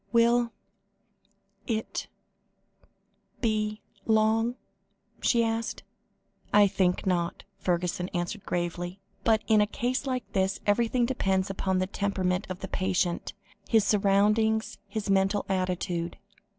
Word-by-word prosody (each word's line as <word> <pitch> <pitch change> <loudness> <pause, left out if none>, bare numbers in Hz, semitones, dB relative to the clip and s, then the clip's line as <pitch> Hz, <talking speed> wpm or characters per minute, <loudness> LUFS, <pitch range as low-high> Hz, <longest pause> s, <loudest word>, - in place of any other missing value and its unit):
"Will 235 0 +4 1.2
it 220 -3 -2 1.3
be 215 -2 0 0.3
long?" 220 +2 +3 0.7
she 235 -2 +3
asked. 225 0 -2 0.7
"I 205 0 +7
think 190 -2 +1
not," 175 -2 0 0.2
Fergusson 180 0 -1
answered 175 +3 -3
gravely, 175 +1 -3 0.2
"but 220 -1 +3
in 215 -2 +5
a 210 - +3
case 250 +5 -2
like 255 -1 -1
this 190 0 +1
everything 235 +3 +2
depends 195 -6 0
upon 190 -1 0
the 185 - +1
temperament 190 -1 -1
of 185 -1 -5
the 190 - -4
patient, 185 -2 -1 0.4
his 220 -3 +5
surroundings, 210 +2 +2
his 205 +1 -4
mental 195 +1 +2
attitude. 180 -2 -1
200 Hz, 110 wpm, -28 LUFS, 185-220 Hz, 1.3 s, I